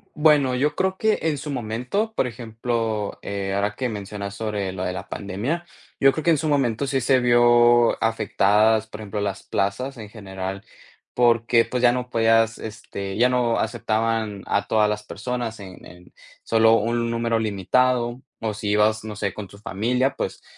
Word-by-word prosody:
Bueno, 150 -4 +4
yo 145 +4 0
creo 190 0 0
que 220 +1 +1
en 155 -3 0
su 145 +2 -6
momento, 125 - -2
por 130 - +1
ejemplo, 115 -2 -3
eh, 100 -1 -3
ahora 100 +1 -1
que 130 - -2
mencionas 100 -1 -6
sobre 105 -3 -3
lo 95 0 -5
de 90 - -2
la - - -7
pandemia, 115 - -3 0.3
yo 135 -1 +6
creo 155 - -4
que 170 - +4
en 160 - +4
su 155 - -2
momento 135 -2 +1
sí 135 -1 0
se 130 +2 +3
vio 120 -1 +4
afectadas, 110 0 +2
por 110 0 -9
ejemplo, 105 0 -4
las 100 0 -3
plazas 125 +8 -2
en 110 -3 -9
general, 95 -2 -6 0.5
porque, 115 -1 +3
pues, 125 +1 -3
ya 120 - +7
no 125 0 -3
podías, 115 -1 +3
este, 100 -3 -6
ya 125 +2 +4
no 125 -2 +1
aceptaban 110 -2 -1
a 105 0 0
todas 105 -1 +3
las 105 0 -3
personas 115 +1 -4
en 95 -2 -11
en 90 0 -15 0.3
solo 115 0 +4
un 115 +2 0
número 115 -1 0
limitado. 120 +4 +1 0.2
O 110 -1 -2
si 105 0 -4
ibas, 105 +1 +2
no 110 -1 -6
sé, 100 -2 -2
con 105 -2 -7
tu 100 - -15
familia, 115 +6 0
pues, - - -4
115 Hz, 180 wpm, -23 LUFS, 105-125 Hz, 0.5 s, ya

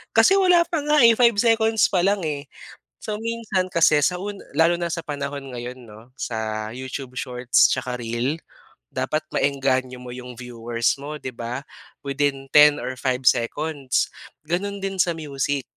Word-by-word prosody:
kasi 390 +1 +6
wala 360 -3 +5
pa 335 -1 -2
nga, 300 -2 +3 0.2
5 235 -2 +5
seconds 225 0 +3
pa 185 - +2
lang, 195 +1 +1
eh. 145 -2 -3 0.5
So 215 - -5
minsan 225 -5 -1
kasi 155 -3 +4
sa 180 +4 +2
un 200 +1 -6 0.2
lalo 165 +1 +5
na 170 0 -2
sa 165 0 -4
panahon 140 -2 -5
ngayon 125 +1 -6
'no 110 +3 -15
sa 110 -1 -3
YouTube 130 0 -6
shorts 125 -1 +2
tsaka 125 -1 -2
reel, 120 +7 -2 0.5
dapat 145 +4 -1
maengganyo 130 -2 0
mo 125 - -8
yung 125 0 -8
viewers 120 0 -2
mo 145 +2 -6
'di 130 -3 -6
ba 120 +3 -5 0.4
within 140 -1 -2
10 150 0 +7
or 130 +2 -4
5 130 0 -1
seconds 140 +3 +1 0.4
ganun 195 +6 -2
din 195 -1 -3
sa 170 -1 +2
music 140 -3 -2
140 Hz, 160 wpm, -23 LUFS, 125-180 Hz, 0.5 s, 10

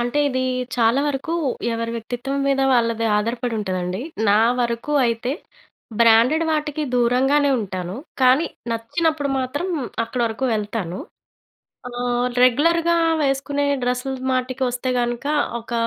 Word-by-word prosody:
అంటే, 245 +4 -1
ఇది 260 -1 -1 0.3
చాలా 235 +3 +3
వరకు 290 +4 -3 0.4
ఎవరి 230 0 -3
వ్యక్తిత్వం 245 +4 -4
మీద 270 0 +2
వాళ్ళది 230 -1 +1
ఆధారపడి 230 +3 -1
ఉంటుందండి. 185 -1 -3 0.3
నా 205 +2 +5 0.2
వరకు 235 +4 -2
అయితే 235 +3 -1 0.7
బ్రాండెడ్ 235 +8 +5
వాటికి 305 -1 -1
దూరంగానే 265 +4 +3
ఉంటాను. 185 -1 -5 0.3
కానీ 260 +6 +5 0.2
నచ్చినప్పుడు 290 +6 -1
మాత్రం 265 +7 -2 0.4
అక్కడ 240 +2 -4
వరకు 225 +3 -3
వెళ్తాను. 205 -4 -3 0.9
ఆహ్, 245 0 -1 0.2
రెగ్యులర్‌గా 335 +7 +3 0.3
వేసుకునే 280 +1 0 0.2
డ్రెస్సులు 250 +2 -2
మాటికి 255 +1 -1
వస్తే 250 +1 -3
గనుక. 240 +1 -2 0.3
ఒక 235 +1 -9
245 Hz, 115 wpm, -21 LUFS, 230-275 Hz, 0.9 s, నా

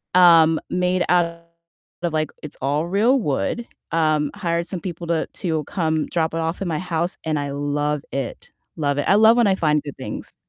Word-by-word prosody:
Um, 165 -3 +6
made 180 0 +1
out 175 -1 +4 0.8
of, 175 -1 -1
like 155 -1 0
it's 150 - -8
all 145 +4 0
real 220 +9 +3
wood, 225 - -2 0.2
um, 155 -3 +1
hired 170 -4 -1
some 185 - -3
people 170 -1 -6
to 165 -1 0
to 160 -4 -2
come 160 -4 -1
drop 160 -2 -1
it 165 - -1
off 165 +1 -2
at 195 - -2
my 160 -3 -1
house 175 0 -2
and 155 -1 -1
I 145 -1 -3
love 145 +1 -1
it. 135 -3 -5 0.3
Love 145 -2 0
it, 145 - 0
I - - +5
love 220 +2 +6
when 240 - +4
I 195 - +4
find 150 -4 +1
good 145 -2 -7
things. 130 - -6
165 Hz, 200 wpm, -22 LUFS, 150-180 Hz, 0.8 s, Um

